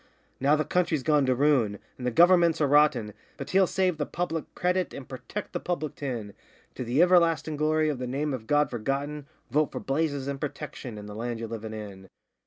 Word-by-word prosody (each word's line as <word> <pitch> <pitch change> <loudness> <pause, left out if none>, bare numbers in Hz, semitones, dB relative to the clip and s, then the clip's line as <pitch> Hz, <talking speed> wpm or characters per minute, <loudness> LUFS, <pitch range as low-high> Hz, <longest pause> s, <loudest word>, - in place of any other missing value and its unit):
Now 140 +3 +4
the 155 - 0
country's 170 -6 0
gone 150 -2 +3
to 130 - +3
ruin, 125 -7 +2 0.2
and 125 - -4
the - - +3
Governments 170 +4 +5
are 150 - +3
rotten, 140 -7 +3 0.2
But - - -6
he'll 190 0 +4
save 185 -4 0
the 150 - -1
public 165 -2 -3
credit 180 +1 0
and 135 - -8
purtect 165 +10 -7
the - - -1
public 155 -5 -3
tin; 120 -8 -5 0.4
To - - -5
the 125 +6 +2
iverlastin' 165 -4 +3
glory 155 +1 +2
of 145 -4 -1
the 125 - -3
name 140 +3 -2
of 115 -4 -6
God 145 0 +2
Forgotten 140 +5 -3 0.2
Vote 150 +3 +2
for - - -4
Blazes 140 -1 -1
and 140 -1 -4
Protection, 140 -5 -6
and 105 0 -8
the 105 - -8
land 120 +2 -3
ye're 115 - -4
livin' 110 -1 -6
in! 100 -3 -9
145 Hz, 205 wpm, -27 LUFS, 125-155 Hz, 0.4 s, Governments